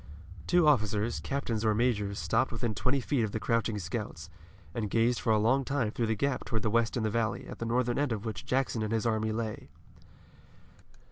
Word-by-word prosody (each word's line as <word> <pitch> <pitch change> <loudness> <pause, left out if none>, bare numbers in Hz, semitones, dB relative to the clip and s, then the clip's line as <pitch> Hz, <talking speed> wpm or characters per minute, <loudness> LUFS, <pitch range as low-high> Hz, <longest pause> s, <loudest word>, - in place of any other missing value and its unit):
Two 175 -3 +4
officers, 110 -4 +2
captains 120 -6 -2
or 110 -1 +3
majors, 105 -4 +1
stopped 115 +3 +1
within 115 -1 -2
twenty 130 +6 +1
feet 130 0 0
of 105 - -2
the 110 - -1
crouching 115 -1 0
scouts, 90 -3 -5 0.4
and 110 -3 -2
gazed 115 +3 +2
for 115 - +1
a 110 - +5
long 120 +6 +3
time 130 -5 0
through 115 0 -1
the 110 - +1
Gap 140 +4 -1
toward 110 -3 -2
the 110 - +1
west 115 +2 +2
into 110 -2 0
the - - -5
valley, 115 -3 -1
at - - -9
the 115 - -3
northern 120 +1 +1
end 145 -3 +1
of 110 -1 -3
which 110 - -4
Jackson 130 -3 0
and 110 0 -2
his 115 +1 0
army 110 -1 +1
lay. 110 -1 -4
115 Hz, 210 wpm, -30 LUFS, 110-125 Hz, 0.4 s, a